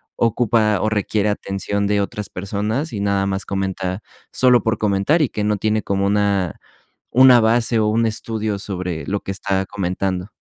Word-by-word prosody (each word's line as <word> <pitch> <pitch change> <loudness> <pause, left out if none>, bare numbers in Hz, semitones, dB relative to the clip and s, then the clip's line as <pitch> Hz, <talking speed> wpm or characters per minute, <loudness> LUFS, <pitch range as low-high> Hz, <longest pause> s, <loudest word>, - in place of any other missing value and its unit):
ocupa 115 -2 +2
o 110 - +1
requiere 105 0 0
atención 100 0 -2
de 105 0 +1
otras 100 0 -4
personas, 105 - -3
y 105 - -3
nada 100 -1 +1
más 95 0 -2
comenta 95 0 -3 0.3
solo 125 -3 +4
por 110 -1 0
comentar 105 - +1
y 130 - 0
que 105 - -3
no 105 0 +1
tiene 110 +1 0
como 100 0 0
una 100 -3 0 0.6
una 130 -1 +8
base 115 +1 +2
o 110 - +2
un 115 +2 +2
estudio 110 -1 -3
sobre 90 -5 -4
lo 100 +1 -1
que - - -10
está 95 0 -1
comentando. 95 0 -3
105 Hz, 170 wpm, -20 LUFS, 95-110 Hz, 0.6 s, una